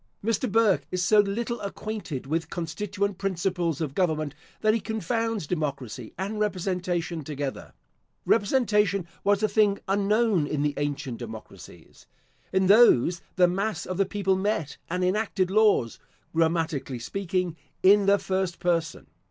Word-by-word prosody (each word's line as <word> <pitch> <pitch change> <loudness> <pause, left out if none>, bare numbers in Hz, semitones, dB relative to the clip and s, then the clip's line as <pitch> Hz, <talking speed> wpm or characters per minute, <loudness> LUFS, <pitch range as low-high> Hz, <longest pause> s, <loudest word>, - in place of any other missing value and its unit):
Mr. 230 +1 0
Burke 220 -3 +3
is 180 0 -1
so 215 +1 +5
little 230 +4 0
acquainted 200 -8 -5
with 160 +3 -2
constituent 190 +3 -3
principles 180 -4 -1
of 150 -4 -2
government, 155 -4 0 0.3
that 215 0 +4
he 230 - +1
confounds 225 -1 -2
democracy 140 -8 -4
and 200 +4 -3
representation 180 -4 -1
together. 140 -1 -5 0.5
Representation 210 -4 +2 0.2
was 205 +1 +2
a - - +5
thing 210 -2 +3
unknown 200 -3 +2
in 145 -1 -1
the 145 -1 +1
ancient 140 -4 -3
democracies. 110 -2 -11 0.4
In 190 0 +2
those 185 - +5
the 180 -1 +5
mass 200 +5 -2
of 185 - -4
the 195 - +3
people 195 -1 0
met 190 -6 -1
and 180 +2 -1
enacted 190 -1 0
laws 210 - +3 0.3
(grammatically 160 -5 0
speaking) 180 +5 -2 0.3
in 200 +1 +6
the 200 0 +6
first 190 -3 -2
person. 165 -1 -1
185 Hz, 135 wpm, -26 LUFS, 165-205 Hz, 0.5 s, in